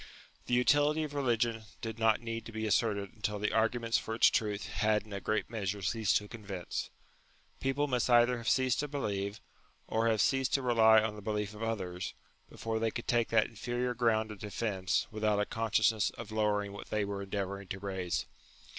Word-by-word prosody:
The 125 - +2
utility 145 +4 +3
of 150 -1 -5
religion 120 -5 0
did 115 0 -5
not 110 0 +3
need 115 -1 -4
to - - -8
be 110 0 -3
asserted 100 -2 +1
until 105 -1 -3
the 105 +1 -1
arguments 115 +1 +2
for 110 - -4
its 115 - +6
truth 105 -2 -1
had 110 -2 +1
in 105 - -10
a 100 - -4
great 110 -3 0
measure 100 -3 -3
ceased 110 +3 +2
to 105 - -5
convince. 100 -6 -5 0.7
People 135 +2 0
must 125 -2 0
either 120 0 +5
have 115 -1 -1
ceased 130 0 +2
to 150 - -1
believe, 100 -7 -3 0.5
or 115 +1 +1
have 110 -2 +2
ceased 135 +5 +2
to 135 - 0
rely 110 -3 +6
on 110 -1 -1
the 105 - -9
belief 105 0 -2
of 105 - -10
others, 95 -5 -3 0.3
before 115 0 -3
they 115 0 +1
could 120 +2 -6
take 120 -1 +2
that 110 -1 +3
inferior 120 +2 -2
ground 110 -2 +1
of 105 - -9
defence 100 -2 -1
without 105 -1 +1
a 105 - +2
consciousness 110 -1 +2
of 115 -2 -9
lowering 105 -2 0
what 100 - -9
they 105 -1 0
were 100 0 -4
endeavouring 100 0 -4
to 95 - -4
raise. 95 -9 -2
110 Hz, 195 wpm, -32 LUFS, 105-115 Hz, 0.7 s, its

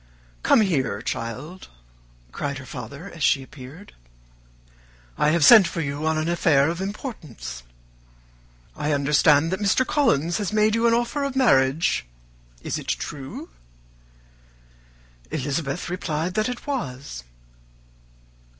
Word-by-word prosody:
"Come 225 - +5
here, 135 - 0
child," 135 +14 -5 0.6
cried 140 - -3
her 135 - -9
father 140 - -8
as 165 - -11
she 135 -1 +3
appeared. 140 +8 -12 1.2
"I 150 - +2
have 155 -1 +3
sent 220 -7 +9
for - - -5
you 145 0 -2
on 160 0 +1
an 155 +1 -1
affair 160 -4 +3
of 170 +2 -5
importance. 155 - -6 1.1
I 150 0 -1
understand 145 +2 +3
that 190 - -1
Mr. 210 +5 +2
Collins 175 - +1
has 205 -2 -2
made 215 0 +3
you 230 +1 +3
an 230 - +4
offer 240 +5 -1
of 275 -1 -3
marriage. 135 - +3 0.6
Is - - -2
it - - -11
true?" 135 - -5 1.8
Elizabeth 140 +3 -3
replied 175 -1 -2
that 215 +4 0
it 250 - -6
was. 135 - -5
160 Hz, 125 wpm, -24 LUFS, 140-205 Hz, 1.8 s, sent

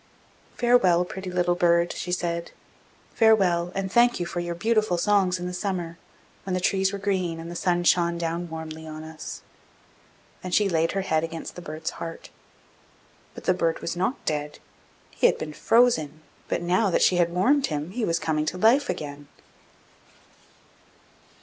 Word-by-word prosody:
'Farewell, 190 -8 +4
pretty 190 +1 -7
little 175 -1 +1
bird!' 170 -1 +2
she 180 - -5
said. 170 -1 -2 0.6
'Farewell, 185 -6 +3
and 190 -1 -2
thank 240 0 +4
you 175 - -1
for 175 - -4
your 175 0 -3
beautiful 215 -1 +1
songs 190 -1 +2
in 180 - -6
the 180 - -4
summer, 180 -3 -3 0.4
when 185 -1 -2
the - - 0
trees 190 +1 +1
were 200 - -4
green, 185 -4 -1
and 165 +1 -7
the - - -7
sun 175 0 0
shone 170 0 +3
down 170 +1 -3
warmly 160 0 -7
on 155 0 -7
us!' 160 -1 -8 1.0
Then 185 - -6
she 205 +1 +4
laid 165 -2 +1
her 195 - 0
head 160 -4 0
against 165 0 -6
the 180 - -8
bird's 155 -1 -5
heart. 165 0 -7 1.0
But - - -10
the 185 - +3
bird 165 -2 0
was 170 - -4
not 190 +9 -2
dead: 150 -1 -2 0.5
he - - +3
had - - +1
been 155 -1 -6
frozen, 160 -10 +2 0.2
but - - -2
now 185 +4 +2
that 175 - +2
she 180 - +4
had 170 -1 +2
warmed 265 +11 +2
him, 150 +2 -4
he 235 +3 -3
was 165 -4 +1
coming 155 -1 -1
to 180 - -2
life 245 +9 +4
again. 145 -1 -5
175 Hz, 175 wpm, -25 LUFS, 165-190 Hz, 1.0 s, Farewell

